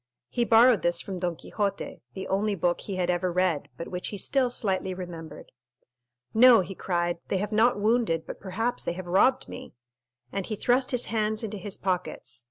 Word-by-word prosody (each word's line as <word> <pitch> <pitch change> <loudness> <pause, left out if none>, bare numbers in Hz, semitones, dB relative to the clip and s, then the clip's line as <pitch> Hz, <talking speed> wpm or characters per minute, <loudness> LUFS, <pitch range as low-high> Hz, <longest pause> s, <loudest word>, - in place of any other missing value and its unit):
He 240 -1 0
borrowed 230 -3 +6
this 175 +1 +1
from 190 -1 -5
Don 175 -1 -1
Quixote, 200 +3 -3
the 190 -1 -5
only 205 +2 0
book 175 -1 0
he 195 - -5
had 180 -1 +1
ever 180 +1 0
read, 180 -4 0
but 170 - -6
which 180 0 -4
he 205 - -4
still 255 +6 +1
slightly 190 -5 -1
remembered. 170 -3 -8 0.8
"No," 235 -1 +8
he 190 +2 -6
cried, 175 -2 -1
"they 195 - 0
have 205 +3 -2
not 220 0 +3
wounded, 210 -6 +1
but - - -8
perhaps 225 +6 -2
they - - -2
have 185 +1 -7
robbed 195 +9 +3
me!" - - -9 0.6
and 195 -2 -3
he 215 - -2
thrust 250 +4 +2
his 250 -2 +1
hands 215 0 -1
into 215 -1 -4
his 195 0 -5
pockets. 180 -9 -3
195 Hz, 190 wpm, -27 LUFS, 180-220 Hz, 0.8 s, No